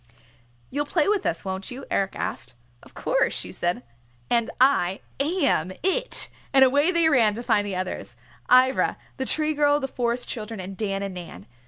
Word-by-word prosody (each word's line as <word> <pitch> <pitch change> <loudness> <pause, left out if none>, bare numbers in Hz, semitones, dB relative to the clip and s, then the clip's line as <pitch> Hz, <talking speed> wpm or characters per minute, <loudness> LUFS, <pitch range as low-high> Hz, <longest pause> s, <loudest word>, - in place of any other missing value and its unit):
"You'll 290 +2 -2
play 310 0 +1
with 410 -2 +1
us, 165 - -2
won't 190 0 -4
you?" 260 +2 -8
Eric 195 0 0
asked. - - -4 0.3
"Of - - -18
course," - - +1
she - - -5
said, 175 -7 -2 0.5
"and 235 -1 +2
I 200 -9 +3 0.2
am 280 - +1
It!" 480 +7 +1 0.3
And 265 -1 +7
away 285 +5 +3
they 340 -2 +3
ran 235 -9 +4
to 235 - -5
find 205 -3 +2
the 195 - -3
others, 185 0 -5 0.3
Ivra, 255 +1 +4 0.2
the 265 - -2
Tree 310 +3 +2
Girl, 290 0 +3
the 270 - -3
Forest 245 -1 -1
Children, 220 -2 -5
and 190 +1 -6
Dan 195 -1 -2
and 195 -1 -4
Nan. 170 - -9
245 Hz, 180 wpm, -25 LUFS, 195-290 Hz, 0.5 s, And